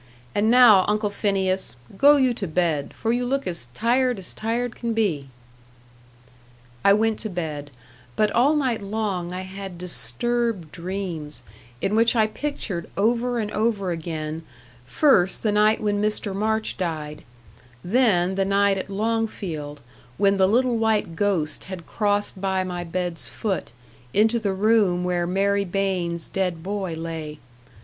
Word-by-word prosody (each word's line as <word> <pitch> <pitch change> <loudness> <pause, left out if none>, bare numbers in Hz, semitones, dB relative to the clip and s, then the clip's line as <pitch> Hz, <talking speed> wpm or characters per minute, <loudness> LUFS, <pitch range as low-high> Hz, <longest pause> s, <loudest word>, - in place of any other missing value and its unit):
And 210 +2 +2
now, 235 -6 +7
Uncle 210 0 0
Phineas, 190 - 0 0.2
go 285 +8 +6
you 260 -3 +3
to 205 -4 -4
bed, 160 -3 0
for 225 +1 -1
you 245 +1 0
look 275 +3 -1
as 170 -8 -4
tired 245 +1 +2
as 185 -3 -6
tired 235 +2 -2
can 230 -2 -3
be." 170 -11 0 1.6
I 200 - +6
went 220 +2 +2
to 220 - 0
bed; 155 -5 -4 0.5
but 215 -1 +2
all 275 +6 +3
night 255 -7 0
long 200 -4 -3
I 180 +1 -4
had 190 -1 -8
disturbed 180 - +1
dreams, 175 -4 -4 0.4
in 200 +2 0
which 230 +2 +4
I 220 -2 +4
pictured 215 - -4
over 240 +4 +1
and 210 -2 -2
over 210 -4 0
again, 160 -1 -4 0.5
first 190 - +3
the 215 - +2
night 210 +1 +3
when 205 -1 0
Mr. 210 -1 -1
March 220 +2 -1
died 155 -5 -4 0.6
then 190 -4 +2
the 195 0 +1
night 200 0 +2
at 190 - -6
Longfield, 195 -9 -3 0.4
when 200 0 +3
the 190 -1 +4
little 240 +3 +2
white 220 -6 0
ghost 165 -5 -1
had 185 -3 -8
crossed 205 -2 -1
by 190 -1 0
my 180 -1 -4
bed's 175 0 -2
foot, 205 -5 -3 0.4
into 220 +3 +4
the 200 -3 -1
room 200 -3 +3
where 175 -1 0
Mary 200 +2 +1
Baines' 180 -3 -2
dead 180 -4 -2
boy 190 -3 -3
lay. 160 -2 -6
195 Hz, 150 wpm, -23 LUFS, 175-220 Hz, 1.6 s, now